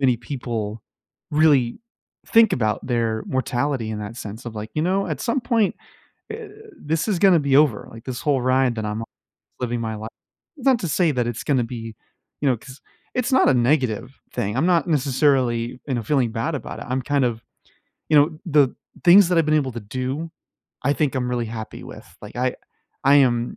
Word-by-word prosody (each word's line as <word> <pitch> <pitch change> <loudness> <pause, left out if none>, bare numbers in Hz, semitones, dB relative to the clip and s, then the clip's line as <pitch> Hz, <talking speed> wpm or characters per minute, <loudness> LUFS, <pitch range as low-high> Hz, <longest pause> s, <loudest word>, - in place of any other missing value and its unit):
many 130 -3 +3
people 115 -4 -5 0.5
really 145 - +3 0.5
think 225 -3 +5
about 110 -4 0
their 115 -3 0
mortality 130 -2 -1
in 105 - -4
that 105 +2 -7
sense 110 +1 -8
of, 115 - -6
like, 105 +1 -6
"You 155 - 0
know, 190 +3 +1
at - - -3
some 250 +2 0
point, 230 -4 +1 0.6
eh 440 -1 -6 0.3
this 160 +7 -1
is 190 -5 +1
gonna 190 -3 +6
be 140 -1 +2
over, 145 -8 +3
like, 115 0 -12
this 130 -2 -5
whole 140 -3 +2
ride 130 -1 +2
that 110 - -3
I'm 105 +1 -3
on - - -6 0.5
living 120 -1 -2
my 110 -1 -3
li" 110 +1 -6 0.5
Not 260 -2 +3
to 175 - -2
say 160 +1 +2
that 125 -2 0
it's 120 -1 -4
gonna 130 -5 +2
be 115 -2 -7 0.5
you 145 - +2
know, 125 - +2
'cause 130 +2 -13 0.3
it's 250 +2 -1
not 260 - +5
a 135 - +4
negative 125 -1 0
thing. 105 -3 -2
I'm 155 - +2
not 175 -2 +3
necessarily, 130 -5 +1
you 130 - 0
know, 120 - -1
feeling 125 -1 +1
bad 125 +8 -2
about 140 - -6
it. - - -6
I'm 130 0 -1
kind 140 0 +1
of 115 -2 -2 0.7
you 155 - +5
know, 155 +2 +4
the 145 -6 +3 0.3
things 180 +1 +8
that 180 -2 +2
I've 165 - +4
been 155 - +2
able 140 -4 +1
to 120 - -6
do, 130 +9 -4 0.5
I 140 +3 +2
think 145 -4 0
I'm 125 -1 -1
really 120 -1 -1
happy 110 -1 -7
with, - - -12
like, - - -10
I 125 0 0 0.5
I 140 +1 +6
am 120 -4 +2
130 Hz, 205 wpm, -22 LUFS, 115-155 Hz, 0.7 s, things